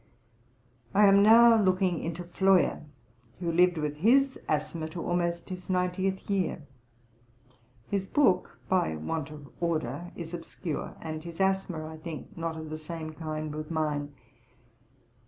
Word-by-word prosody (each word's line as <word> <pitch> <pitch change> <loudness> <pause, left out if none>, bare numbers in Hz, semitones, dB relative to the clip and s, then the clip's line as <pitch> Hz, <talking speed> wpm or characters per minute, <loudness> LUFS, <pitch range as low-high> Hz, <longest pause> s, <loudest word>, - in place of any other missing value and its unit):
I 210 - +7
am 200 0 +7
now 230 +1 +7
looking 185 -2 +2
into 170 +1 -4
Floyer 190 +1 +2 0.6
who 170 -2 -1
lived 175 +1 +4
with 150 -1 -2
his 265 - +3
asthma 155 +1 -1
to 170 +1 -6
almost 170 0 -1
his 185 0 -7
ninetieth 185 +1 0
year. 190 -6 -1 1.2
His 195 -1 -1
book 195 -11 +2
by 180 - +1
want 150 - -3
of 150 -2 -10
order 165 -1 -2
is 170 -1 -7
obscure, 170 -1 -5
and 155 -1 -5
his 170 0 -9
asthma, 190 -4 0
I 160 0 -8
think, 155 -1 -8
not 165 -1 -3
of 155 -1 -7
the 155 - -4
same 155 0 -6
kind 155 -1 -4
with 155 0 -6
mine. 150 -3 -2
170 Hz, 140 wpm, -29 LUFS, 155-185 Hz, 1.2 s, I